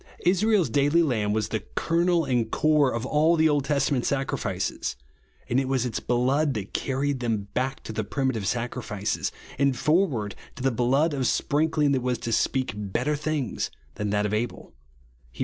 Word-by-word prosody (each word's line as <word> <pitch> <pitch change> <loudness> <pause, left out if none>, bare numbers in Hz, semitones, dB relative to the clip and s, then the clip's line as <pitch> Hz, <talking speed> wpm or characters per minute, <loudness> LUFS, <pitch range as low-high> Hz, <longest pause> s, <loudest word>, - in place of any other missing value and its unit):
Israel's 195 +1 +3
daily 145 +4 +3
lamb 110 -9 0
was 110 0 0
the 110 - -1 0.2
kernel 170 0 +2
and 120 -4 0
core 150 -2 +3
of 115 +1 -3
all 155 +4 +3
the 160 -1 +4
Old 145 -3 +1
Testament 140 -3 +1
sacrifices; 125 - -2 0.5
and 125 - +2
it 135 - -1
v^as 130 -2 +1
its 120 -3 -2
blood 130 +4 +1
that 100 -2 -5
carried 135 0 -1
them 110 -5 -2
back 130 +2 -2
to 110 - -6
the 110 - -1
primitive 115 -2 -1
sacrifices, 120 -4 -2 0.3
and 140 -2 +2
forward 150 - +1 0.2
to 130 - -7
the 135 - +3
blood 135 +7 +2
of 130 -3 0
sprinkling 150 0 +1
that 135 -2 +1
was 125 0 0
to 115 - -4
speak 130 +1 +1
better 105 +9 -1
things 150 -4 -2 0.2
than 105 0 -3
that 105 0 +1
of 105 - -1
Abel, 115 +3 -3 0.6
(Heb. - - -15
130 Hz, 175 wpm, -26 LUFS, 115-150 Hz, 0.6 s, the